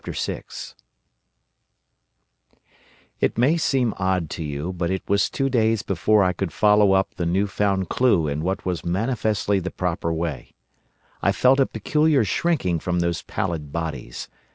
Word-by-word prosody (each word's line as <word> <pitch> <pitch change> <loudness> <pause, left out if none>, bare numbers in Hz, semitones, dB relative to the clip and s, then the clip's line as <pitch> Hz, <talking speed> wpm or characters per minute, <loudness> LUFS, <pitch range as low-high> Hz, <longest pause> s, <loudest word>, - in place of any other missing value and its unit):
The - - -5 0.2
Morlocks - - -7 2.5
"It - - 0
may 130 +7 +4
seem 135 -8 +1
odd 95 -4 0
to 80 - -4
you, 75 +4 -4
but 85 -1 -2
it 95 0 -2
was 100 0 +2
two 135 - -1
days 115 -4 +1
before 100 +3 +2
I 90 0 +2
could 90 -1 -3
follow 105 0 +4
up 95 0 +1
the 85 - -3
new 95 +4 +1
found 100 -2 0
clue 105 -11 +2
in 75 +1 -2
what 95 +4 -2
was 90 -3 -2
manifestly 105 +1 0
the 95 0 -4
proper 85 -3 -2
way. 80 -1 -4 0.7
I - - +3
felt 130 +2 +3
a 135 - +4
peculiar 150 +3 +2
shrinking 95 - 0
from 90 +1 -1
those 85 -1 -1
pallid 80 -6 -4
bodies. 80 -7 -5
95 Hz, 155 wpm, -23 LUFS, 85-110 Hz, 2.5 s, may